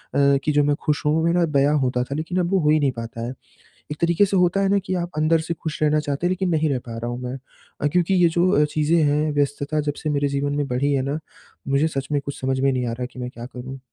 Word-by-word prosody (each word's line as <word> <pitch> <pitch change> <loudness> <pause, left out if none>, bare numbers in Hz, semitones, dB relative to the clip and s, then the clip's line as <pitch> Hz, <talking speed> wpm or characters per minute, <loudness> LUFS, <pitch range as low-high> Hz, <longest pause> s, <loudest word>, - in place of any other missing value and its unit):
कि 140 +1 +3
जो 145 0 +3
मैं 145 0 +2
खुश 150 -1 0
हूँ 150 - +3
वो 160 - +1
मेरा 170 +1 +3
बयाँ 145 -1 +2
होता 125 -2 0
था 135 +2 -5
लेकिन 160 +4 -3
अब 175 0 0
वो 195 - +3
हो 150 -3 +2
ही 155 +1 +4
नहीं 140 -2 +2
पाता 115 -1 -7
है। 125 - -4 0.6
एक 150 - -4
तरीके 170 +4 +4
से 195 0 0
होता 180 +1 +3
है 195 - +2
ना 200 0 +3
कि 185 - -2
आप 175 -1 -3
अंदर 155 +2 +3
से 165 +1 -3
खुश 160 -2 -6
रहना 150 0 +3
चाहते 145 +3 -1
हैं, - - 0
लेकिन 185 0 -1
नहीं 160 -2 +1
रह 135 -3 0
पा 115 -1 -6
रहा 115 +1 -4
हूँ 120 - -5
मैं। 125 +1 -4 0.4
अ, 145 - +2
क्योंकि 175 +4 +1
ये 175 -2 +5
जो 175 +2 +2
अ, - - +3
चीज़ें 155 +2 +1
है 150 +1 +1
व्यस्तता 145 +1 -1
जब 145 0 -2
से 155 - -1
मेरे 145 -1 +1
जीवन 140 +1 -1
में 145 -1 -1
बढ़ी 135 +3 0
है 135 - +1
ना, 150 - -2 0.5
मुझे 140 +3 +2
सच 135 -4 -4
में 145 -1 +1
कुछ 140 - -6
समझ 130 0 0
में 135 +1 +3
नहीं 125 -1 -1
आ - - -2
रहा 125 +2 -4
कि - - -10
मैं 125 0 -4
क्या 120 -1 -9
करूँ? 130 +1 -8
145 Hz, 295 wpm, -22 LUFS, 135-165 Hz, 0.6 s, ये